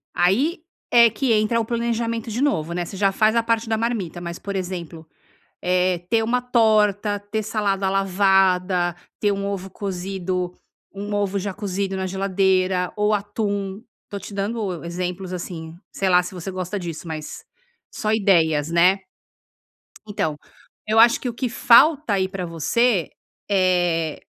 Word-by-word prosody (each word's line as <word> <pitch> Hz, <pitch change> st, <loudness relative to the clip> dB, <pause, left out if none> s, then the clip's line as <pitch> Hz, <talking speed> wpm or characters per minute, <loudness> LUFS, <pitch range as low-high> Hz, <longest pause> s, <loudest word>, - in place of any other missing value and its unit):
aí 225 Hz, -, +2 dB, 0.3 s
é 235 Hz, -1 st, +7 dB
que 230 Hz, +3 st, 0 dB
entra 215 Hz, +2 st, +2 dB
o 225 Hz, -, -1 dB
planejamento 230 Hz, 0 st, -2 dB
de 225 Hz, +4 st, -3 dB
novo, 170 Hz, -, 0 dB
né, 175 Hz, 0 st, -2 dB
você 195 Hz, -, -8 dB
já 195 Hz, 0 st, +3 dB
faz 215 Hz, +3 st, +2 dB
a 230 Hz, -, +4 dB
parte 230 Hz, 0 st, 0 dB
da 220 Hz, -, +1 dB
marmita 220 Hz, -7 st, -2 dB
mas, 170 Hz, 0 st, -5 dB
por 200 Hz, -1 st, -5 dB
exemplo, 175 Hz, -4 st, -5 dB, 0.6 s
eh, 180 Hz, 0 st, +2 dB
ter 225 Hz, -1 st, +3 dB
uma 245 Hz, +3 st, +1 dB
torta, 215 Hz, -4 st, +2 dB
ter 205 Hz, +2 st, -4 dB
salada 200 Hz, -3 st, -1 dB
lavada, 190 Hz, -2 st, +2 dB, 0.2 s
ter 205 Hz, -1 st, +2 dB
um 200 Hz, 0 st, -3 dB
ovo 195 Hz, -1 st, -4 dB
cozido 185 Hz, -1 st, -3 dB, 0.4 s
um 205 Hz, +1 st, -5 dB
ovo 200 Hz, -1 st, 0 dB
já 200 Hz, +1 st, -3 dB
cozido 195 Hz, -1 st, -3 dB
na 190 Hz, 0 st, -2 dB
geladeira 190 Hz, -1 st, +1 dB
ou 210 Hz, 0 st, +2 dB
atum, 205 Hz, -1 st, -3 dB, 0.3 s
tô 200 Hz, -, -5 dB
te 200 Hz, -, -10 dB
dando 200 Hz, -3 st, -3 dB
exemplos, 180 Hz, +2 st, -4 dB
assim, 165 Hz, -2 st, -6 dB, 0.2 s
sei 195 Hz, -, -1 dB
lá 180 Hz, -1 st, +5 dB
se 180 Hz, -, -8 dB
você 180 Hz, +1 st, -6 dB
gosta 185 Hz, +2 st, -4 dB
disso, 170 Hz, -2 st, -6 dB
mas 155 Hz, -1 st, -7 dB, 0.5 s
só 215 Hz, -1 st, -1 dB
ideias, 165 Hz, -8 st, +2 dB
né? 180 Hz, +3 st, +4 dB, 1.1 s
Então, 160 Hz, -8 st, -2 dB, 0.5 s
eu 215 Hz, +1 st, +2 dB
acho 235 Hz, +1 st, +6 dB
que 255 Hz, -, -3 dB
o 235 Hz, -, -4 dB
que 250 Hz, +1 st, -2 dB
falta 270 Hz, +1 st, +5 dB
aí 190 Hz, -1 st, +1 dB
pra 190 Hz, -1 st, -5 dB
você, 175 Hz, +4 st, +1 dB, 0.4 s
eh, 175 Hz, -5 st, +1 dB
195 Hz, 160 wpm, -22 LUFS, 180-215 Hz, 1.1 s, é